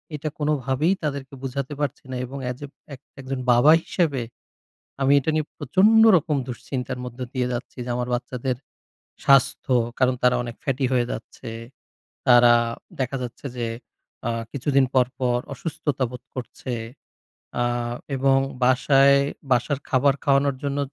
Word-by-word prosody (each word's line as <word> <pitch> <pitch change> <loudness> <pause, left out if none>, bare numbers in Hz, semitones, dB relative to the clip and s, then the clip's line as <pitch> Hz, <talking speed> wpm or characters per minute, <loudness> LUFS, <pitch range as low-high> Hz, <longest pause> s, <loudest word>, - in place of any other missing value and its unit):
এটা 150 +1 -3
কোনোভাবেই 145 +2 +1
তাদেরকে 140 -2 -4
বুঝাতে 135 +2 -3
পারছি 145 - -2
না - - -3
এবং 135 +3 -8
এ - - 0
যে 145 - -6 0.6
একজন 130 0 -4
বাবা 120 +6 +6
হিসেবে 145 -9 0 0.8
আমি 135 - +4
এটা 160 - -1
নিয়ে 155 -1 0
প্রচন্ড 200 - +4
রকম 150 -2 0
দুশ্চিন্তার 125 0 -4
মধ্যে 125 +1 -6
দিয়ে 125 -2 0
যাচ্ছি 120 +2 -6
যে 125 - -5
আমার 125 0 -2
বাচ্চাদের 125 +1 -3 0.7
স্বাস্থ্য 135 -1 +3 0.3
কারণ 130 0 +3
তারা 125 0 +5
অনেক 120 -1 -6
ফ্যাটি 135 -1 0
হয়ে 120 -1 +2
যাচ্ছে। 115 - -8 0.8
তারা 120 -1 +7 0.5
দেখা 130 +1 -1
যাচ্ছে 125 +3 -8
যে 120 -1 -1 0.6
আ - - +1 0.2
কিছুদিন 140 0 +2
পর, 130 -2 +5
পর 125 -1 +1 0.2
অসুস্থতা 140 -1 -3
বোধ 125 - -9
করছে। 130 0 -6 0.9
আ - - +2 0.5
এবং 135 0 +3 0.3
বাসায় 135 +2 +5 0.3
বাসার 125 +3 +1
খাবার 135 +1 +3
খাওয়ানোর 140 -1 +3
জন্য 140 0 -1
130 Hz, 140 wpm, -24 LUFS, 125-140 Hz, 0.9 s, তারা